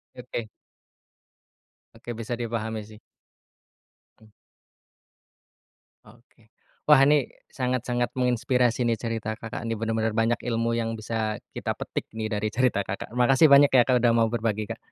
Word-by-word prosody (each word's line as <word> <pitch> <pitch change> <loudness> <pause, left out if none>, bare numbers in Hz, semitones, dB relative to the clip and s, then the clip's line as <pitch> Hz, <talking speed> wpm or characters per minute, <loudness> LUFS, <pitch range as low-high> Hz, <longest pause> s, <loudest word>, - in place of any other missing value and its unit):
Oke. 120 -3 -6 1.5
Oke 120 - -10
bisa 115 +1 -6
dipahami 110 -1 -3
sih. 110 0 -14 1.2
Mmm. 110 -1 -21 1.7
Oke, 115 0 -22 0.4
wah 150 - +9
ini 145 -3 +3 0.2
sangat-sangat 125 -2 -2
menginspirasi 125 0 +1
nih 115 -2 +1
cerita 110 -1 -4
Kakak 110 +1 -6
nih 115 -2 -3
benar-benar 110 0 -1
banyak 115 +2 0
ilmu 115 -1 -1
yang 115 -1 -2
bisa 110 -1 -3 0.2
kita - - -3
petik - - -5
nih 110 0 -4
dari 105 0 -2
cerita 115 -3 +1
Kakak, 100 +4 -6
makasih 130 +5 +5
banyak 140 0 +7
ya 125 -3 +5
Kak 125 -2 +2
udah 120 - +5
mau 115 -1 +3
berbagi 110 -2 -2
Kak. - - -6
115 Hz, 135 wpm, -25 LUFS, 110-125 Hz, 1.7 s, wah